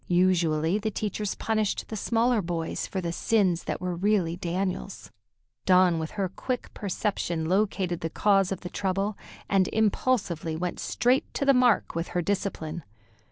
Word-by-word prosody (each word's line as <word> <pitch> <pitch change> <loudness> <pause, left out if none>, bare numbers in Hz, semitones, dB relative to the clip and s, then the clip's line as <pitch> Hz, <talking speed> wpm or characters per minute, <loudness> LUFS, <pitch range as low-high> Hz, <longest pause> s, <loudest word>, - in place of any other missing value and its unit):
Usually, 175 -1 +2
the 215 +1 -1
teachers 210 -1 -3
punished 215 -2 -1
the 220 - -4
smaller 230 +2 +2
boys 170 -2 -3
for 190 - -3
the 170 -1 -2
sins 185 -2 +1
that - - -3
were 180 0 -2
really 185 -2 +1
Daniel's. 185 +2 -3 0.6
Dawn, 180 -2 +5
with 160 +5 -5
her 195 -2 +1
quick 250 +7 -4
perception, 185 -5 -2
located 185 -1 0
the 165 - -2
cause 195 +2 +2
of 190 - -3
the 180 - -6
trouble, 195 +2 -1 0.3
and 190 -2 +3
impulsively 210 -7 0
went 175 +2 -3
straight 245 +4 +1
to 280 - 0
the 275 - +6
mark 250 -3 +3
with 165 +1 -2
her - - +2
discipline. 175 -4 -2
190 Hz, 160 wpm, -27 LUFS, 175-210 Hz, 0.6 s, the